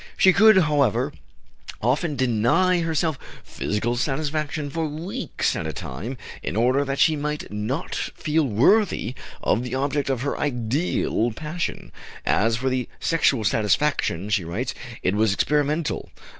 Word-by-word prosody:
She 190 Hz, -, +6 dB
could, 215 Hz, +2 st, +7 dB
however, 145 Hz, -7 st, +1 dB, 0.7 s
often 145 Hz, +7 st, 0 dB
deny 130 Hz, +9 st, +2 dB
herself 160 Hz, -3 st, 0 dB, 0.2 s
physical 115 Hz, +3 st, -2 dB
satisfaction 150 Hz, +2 st, -2 dB
for 160 Hz, 0 st, -1 dB
weeks 160 Hz, +6 st, -2 dB
at -, -, -3 dB
a -, -, -4 dB
time, 105 Hz, -, -6 dB, 0.2 s
in 80 Hz, -, -4 dB
order 125 Hz, +5 st, +3 dB
that 135 Hz, 0 st, -3 dB
she 160 Hz, +2 st, +4 dB
might 150 Hz, -3 st, -4 dB
not 115 Hz, +11 st, -3 dB
feel 155 Hz, 0 st, -1 dB
unworthy 130 Hz, -, +2 dB, 0.3 s
of 115 Hz, -, +2 dB
the 125 Hz, 0 st, -4 dB
object 140 Hz, +1 st, -1 dB
of 130 Hz, -3 st, 0 dB
her 140 Hz, -, -1 dB
ideal 125 Hz, -2 st, 0 dB
passion. 160 Hz, +6 st, -4 dB, 0.3 s
"As 115 Hz, +2 st, +2 dB
for 130 Hz, +3 st, -2 dB
the 130 Hz, -2 st, -2 dB
sexual 140 Hz, -8 st, +2 dB
satisfaction," 105 Hz, -, +1 dB
she 100 Hz, -3 st, +2 dB
writes, 115 Hz, +11 st, -3 dB, 0.3 s
"it 90 Hz, -, +2 dB
was 105 Hz, -1 st, +2 dB
experimental. 150 Hz, +6 st, 0 dB
135 Hz, 140 wpm, -24 LUFS, 115-155 Hz, 0.7 s, could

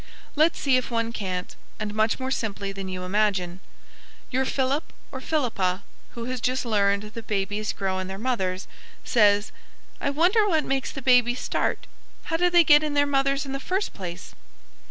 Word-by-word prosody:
Let's 315 Hz, +3 st, +3 dB
see 265 Hz, -3 st, +3 dB
if 255 Hz, -, -2 dB
one 230 Hz, -1 st, -1 dB
can't, 185 Hz, -5 st, -4 dB, 0.2 s
and 210 Hz, -1 st, -3 dB
much 215 Hz, +3 st, +1 dB
more 260 Hz, 0 st, -3 dB
simply 200 Hz, -5 st, -2 dB
than 195 Hz, -1 st, -6 dB
you 185 Hz, -1 st, -5 dB
imagine. 190 Hz, -2 st, 0 dB, 0.7 s
Your 265 Hz, +1 st, +1 dB
Philip, 270 Hz, +3 st, -1 dB, 0.2 s
or 260 Hz, -, -6 dB
Philippa, 200 Hz, -, 0 dB, 0.3 s
who 235 Hz, -1 st, -5 dB
has 255 Hz, -1 st, -4 dB
just 255 Hz, +1 st, 0 dB
learned 200 Hz, -2 st, +2 dB
that 230 Hz, -1 st, -8 dB
babies 205 Hz, +1 st, -1 dB
grow 190 Hz, -1 st, -2 dB
in 185 Hz, -, -4 dB
their 190 Hz, 0 st, -6 dB
mothers, 195 Hz, -5 st, -2 dB, 0.4 s
says: 205 Hz, -2 st, +3 dB, 0.5 s
"I -, -, +1 dB
wonder 360 Hz, +9 st, +3 dB
what 315 Hz, -5 st, +2 dB
makes 270 Hz, -1 st, -1 dB
the 270 Hz, -, -7 dB
babies 250 Hz, -1 st, +4 dB
start. -, -, -1 dB, 0.4 s
How 325 Hz, -, -1 dB
do 355 Hz, +1 st, +3 dB
they 345 Hz, -1 st, +6 dB
get 295 Hz, -1 st, +7 dB
in 300 Hz, -1 st, -2 dB
their 285 Hz, 0 st, +4 dB
mothers 275 Hz, 0 st, +1 dB
in 270 Hz, -, -6 dB
the 275 Hz, -, -3 dB
first 375 Hz, +8 st, -2 dB
place?" 180 Hz, -1 st, -7 dB
235 Hz, 180 wpm, -25 LUFS, 200-275 Hz, 0.7 s, get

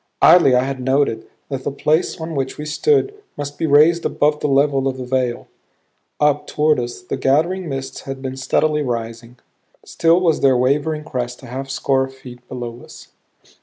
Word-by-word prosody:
Idly 165 Hz, -6 st, +7 dB
I 125 Hz, -, +3 dB
had 135 Hz, 0 st, -4 dB
noted 130 Hz, -3 st, 0 dB, 0.2 s
that 135 Hz, -2 st, -4 dB
the -, -, -2 dB
place 155 Hz, +5 st, 0 dB
on 160 Hz, 0 st, -5 dB
which 135 Hz, -2 st, -3 dB
we 150 Hz, -, -6 dB
stood 410 Hz, -, +1 dB, 0.2 s
must 145 Hz, 0 st, -6 dB
be 160 Hz, -, 0 dB
raised 155 Hz, +4 st, +5 dB
above 150 Hz, 0 st, +1 dB
the -, -, -1 dB
level 140 Hz, -1 st, +2 dB
of 130 Hz, -1 st, -2 dB
the 130 Hz, -, -6 dB
vale. 125 Hz, -1 st, -1 dB, 0.7 s
Up 150 Hz, -1 st, +2 dB
toward 150 Hz, -2 st, +2 dB
us 120 Hz, 0 st, -5 dB
the -, -, -4 dB
gathering 165 Hz, +6 st, +1 dB
mists 135 Hz, -1 st, -5 dB
had 135 Hz, -1 st, -7 dB
been 130 Hz, -1 st, -5 dB
steadily 150 Hz, +3 st, +1 dB
rising; 115 Hz, -2 st, -5 dB, 0.5 s
still 165 Hz, +1 st, +2 dB
was 170 Hz, -4 st, +1 dB
their 135 Hz, -2 st, +4 dB
wavering 150 Hz, +4 st, 0 dB
crest 125 Hz, -4 st, -5 dB
a -, -, -9 dB
half 135 Hz, +2 st, -6 dB
score 135 Hz, -1 st, 0 dB
feet 125 Hz, -2 st, -13 dB
below 120 Hz, -1 st, -7 dB
us. -, -, -14 dB
135 Hz, 180 wpm, -19 LUFS, 130-150 Hz, 0.7 s, Idly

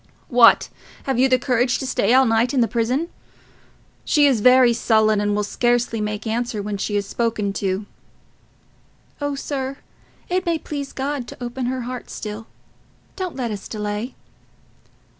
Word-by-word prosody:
"What! 240 Hz, -2 st, +6 dB, 0.3 s
Have 265 Hz, -3 st, -1 dB
you 265 Hz, +1 st, +4 dB
courage 250 Hz, -1 st, +2 dB
to -, -, -5 dB
stay 230 Hz, -4 st, +1 dB
all 260 Hz, +1 st, +6 dB
night 230 Hz, +3 st, +2 dB
in 255 Hz, -, +3 dB
the 230 Hz, -, +3 dB
prison? 250 Hz, +9 st, -1 dB, 0.9 s
She 295 Hz, -2 st, +3 dB
is 260 Hz, -6 st, +3 dB
very 250 Hz, 0 st, +6 dB
sullen, 220 Hz, -2 st, +2 dB
and 205 Hz, 0 st, 0 dB
will 210 Hz, -, 0 dB
scarcely 240 Hz, +1 st, 0 dB
make 210 Hz, +1 st, -3 dB
answer 230 Hz, 0 st, -2 dB
when 205 Hz, 0 st, -3 dB
she 205 Hz, +1 st, -2 dB
is 200 Hz, 0 st, 0 dB
spoken 215 Hz, -2 st, -1 dB
to." 195 Hz, +1 st, -1 dB, 1.4 s
"Oh, 285 Hz, -1 st, -1 dB
sir, 275 Hz, -1 st, -4 dB, 0.5 s
it 365 Hz, +1 st, 0 dB
may 340 Hz, -3 st, 0 dB
please 285 Hz, -3 st, -6 dB
God 270 Hz, -2 st, -3 dB
to -, -, -10 dB
open 245 Hz, +1 st, -3 dB
her 255 Hz, 0 st, -2 dB
heart 250 Hz, +1 st, -6 dB
still. 215 Hz, +1 st, -6 dB, 0.7 s
Don't 370 Hz, -3 st, -4 dB
let 245 Hz, -4 st, -3 dB
us 205 Hz, -2 st, -6 dB
delay." 210 Hz, +3 st, -4 dB
240 Hz, 160 wpm, -21 LUFS, 215-265 Hz, 1.4 s, What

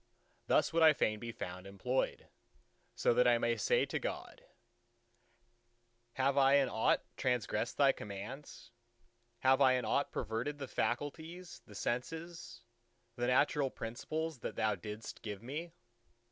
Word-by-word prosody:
Thus -, -, +3 dB
would 165 Hz, -, +3 dB
I 160 Hz, -1 st, +8 dB
fain 110 Hz, -6 st, +1 dB
to 120 Hz, -, -7 dB
be -, -, -3 dB
found 95 Hz, -3 st, -7 dB
employed, 125 Hz, +7 st, -2 dB, 0.7 s
so -, -, +3 dB
that 125 Hz, +1 st, +4 dB
I 120 Hz, -1 st, +5 dB
may 120 Hz, 0 st, +1 dB
say 110 Hz, -, +2 dB
to -, -, -3 dB
God, -, -, -5 dB, 1.7 s
"Have 135 Hz, +1 st, +2 dB
I 135 Hz, 0 st, +6 dB
in 140 Hz, -2 st, +4 dB
aught 110 Hz, -, +2 dB
transgressed 120 Hz, -2 st, -1 dB
Thy 140 Hz, -1 st, +6 dB
commands? 115 Hz, +4 st, -8 dB, 0.7 s
Have 130 Hz, +1 st, +4 dB
I 130 Hz, -1 st, +6 dB
in 125 Hz, -2 st, 0 dB
aught 140 Hz, -, +1 dB
perverted 115 Hz, +5 st, -3 dB
the 140 Hz, -2 st, -5 dB
faculties, 160 Hz, +10 st, -3 dB
the 105 Hz, -, -13 dB
senses, 160 Hz, -, -4 dB, 0.5 s
the 120 Hz, 0 st, -1 dB
natural 135 Hz, +2 st, +3 dB
principles 155 Hz, +7 st, -4 dB
that -, -, -5 dB
Thou 110 Hz, -1 st, +1 dB
didst 105 Hz, +4 st, -7 dB
give 105 Hz, -1 st, -6 dB
me? 155 Hz, +7 st, -5 dB
125 Hz, 145 wpm, -34 LUFS, 110-145 Hz, 1.7 s, I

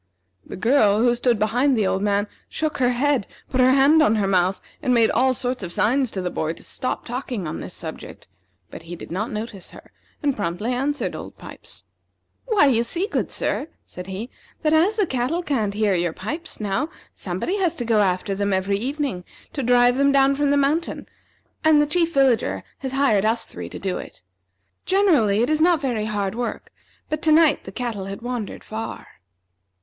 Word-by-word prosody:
The -, -, -9 dB
girl, 215 Hz, -1 st, +4 dB
who 240 Hz, 0 st, +4 dB
stood 240 Hz, -1 st, +1 dB
behind 245 Hz, +6 st, +2 dB
the 215 Hz, -, +2 dB
old 190 Hz, 0 st, 0 dB
man, 205 Hz, 0 st, +1 dB, 0.2 s
shook 310 Hz, -2 st, -2 dB
her 250 Hz, -1 st, +3 dB
head, 255 Hz, -2 st, +1 dB, 0.2 s
put 260 Hz, -1 st, +2 dB
her 255 Hz, -, +6 dB
hand 275 Hz, +4 st, +5 dB
on 225 Hz, -7 st, +4 dB
her 210 Hz, -2 st, +1 dB
mouth, 185 Hz, 0 st, +2 dB, 0.2 s
and 250 Hz, -, +2 dB
made 230 Hz, -1 st, +4 dB
all 260 Hz, 0 st, +2 dB
sorts 250 Hz, -1 st, -3 dB
of 180 Hz, -3 st, -5 dB
signs 255 Hz, +7 st, +1 dB
to 190 Hz, -3 st, -4 dB
the 180 Hz, -, -2 dB
boy 160 Hz, +1 st, -2 dB
to -, -, -13 dB
stop 255 Hz, -, -4 dB
talking 245 Hz, -, -4 dB
on 155 Hz, -, -4 dB
this -, -, -6 dB
subject; -, -, -8 dB, 0.5 s
but -, -, -9 dB
he 170 Hz, +1 st, -8 dB
did -, -, -10 dB
not 205 Hz, +6 st, -2 dB
notice 215 Hz, -3 st, -6 dB
her, -, -, -15 dB, 0.3 s
and 285 Hz, -3 st, +1 dB
promptly 205 Hz, +5 st, -2 dB
answered 280 Hz, +4 st, -1 dB
Old -, -, -9 dB
Pipes. -, -, -10 dB, 0.6 s
"Why, 430 Hz, -10 st, +4 dB
you 245 Hz, -5 st, +3 dB
see, 340 Hz, +11 st, 0 dB
good 425 Hz, -, -2 dB
sir," 295 Hz, -, -1 dB, 0.2 s
said 180 Hz, 0 st, -9 dB
he, 195 Hz, +6 st, -6 dB, 0.3 s
"that 310 Hz, 0 st, +2 dB
as 350 Hz, +7 st, +4 dB
the 420 Hz, -2 st, +2 dB
cattle 270 Hz, +5 st, -1 dB
can't 220 Hz, -10 st, -1 dB
hear 210 Hz, -2 st, +2 dB
your 175 Hz, -2 st, 0 dB
pipes 305 Hz, -, -6 dB
now, 215 Hz, +9 st, -1 dB, 0.2 s
somebody 190 Hz, -, -3 dB
has 350 Hz, -3 st, +1 dB
to 245 Hz, -, -4 dB
go 225 Hz, -2 st, +3 dB
after 190 Hz, +1 st, 0 dB
them 200 Hz, +1 st, -1 dB
every 190 Hz, +1 st, +1 dB
evening 265 Hz, -6 st, -3 dB, 0.3 s
to 280 Hz, -, -2 dB
drive 245 Hz, 0 st, +4 dB
them 280 Hz, 0 st, +4 dB
down 275 Hz, 0 st, +4 dB
from 285 Hz, +1 st, +1 dB
the 285 Hz, -, +3 dB
mountain, 295 Hz, +4 st, 0 dB, 0.6 s
and 315 Hz, -1 st, +5 dB
the 295 Hz, -, +4 dB
Chief 335 Hz, +2 st, +1 dB
Villager 265 Hz, -4 st, +2 dB, 0.2 s
has 265 Hz, -1 st, -4 dB
hired 270 Hz, -8 st, +3 dB
us 225 Hz, +2 st, +1 dB
three -, -, -8 dB
to -, -, -8 dB
do 190 Hz, -2 st, -3 dB
it. -, -, -11 dB, 0.6 s
Generally 290 Hz, -, +3 dB
it 245 Hz, -, 0 dB
is 310 Hz, 0 st, +1 dB
not 340 Hz, -1 st, +4 dB
very 240 Hz, -6 st, -1 dB
hard 205 Hz, -2 st, -2 dB
work, 240 Hz, +1 st, -4 dB, 0.4 s
but 310 Hz, 0 st, -3 dB
to 315 Hz, -, +2 dB
night 310 Hz, -1 st, +4 dB
the 190 Hz, -, -7 dB
cattle 225 Hz, -3 st, -4 dB
had 195 Hz, +3 st, -7 dB
wandered 245 Hz, -4 st, -4 dB
far." 220 Hz, +1 st, -6 dB
245 Hz, 200 wpm, -23 LUFS, 205-285 Hz, 0.6 s, her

